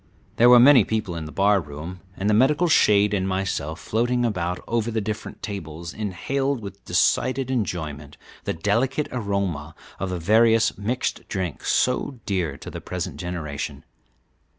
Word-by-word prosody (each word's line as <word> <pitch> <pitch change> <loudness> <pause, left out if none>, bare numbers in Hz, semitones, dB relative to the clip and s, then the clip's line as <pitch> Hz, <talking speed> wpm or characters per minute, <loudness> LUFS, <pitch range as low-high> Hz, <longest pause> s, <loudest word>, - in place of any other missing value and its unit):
There 120 +1 +7
were 125 0 +9
many 130 -2 +8
people 105 -4 -2
in 80 -1 -5
the 75 - -8
bar 100 +5 +3
room, 80 +4 -8 0.2
and 100 - -2
the 105 - +3
medical 145 +10 +4
shade 105 -9 +4
and 95 -2 0
myself, 95 -5 -2
floating 120 +6 0
about 90 -5 -1
over 115 -1 0
the 110 -1 -1
different 105 +1 -5
tables, 85 -4 -6
inhaled 130 +7 -2
with 100 -2 -9
decided 130 +8 +1
enjoyment 80 - -3 0.3
the - - -1
delicate 115 - 0
aroma 100 - -2 0.2
of 95 - -2
the 90 - -2
various 110 +5 +4
mixed 115 +6 -3
drinks 95 -5 -3
so 125 0 +1
dear 90 -8 -1
to - - -9
the - - -7
present 90 -2 -5
generation. 85 -5 -5
100 Hz, 155 wpm, -24 LUFS, 85-115 Hz, 0.3 s, were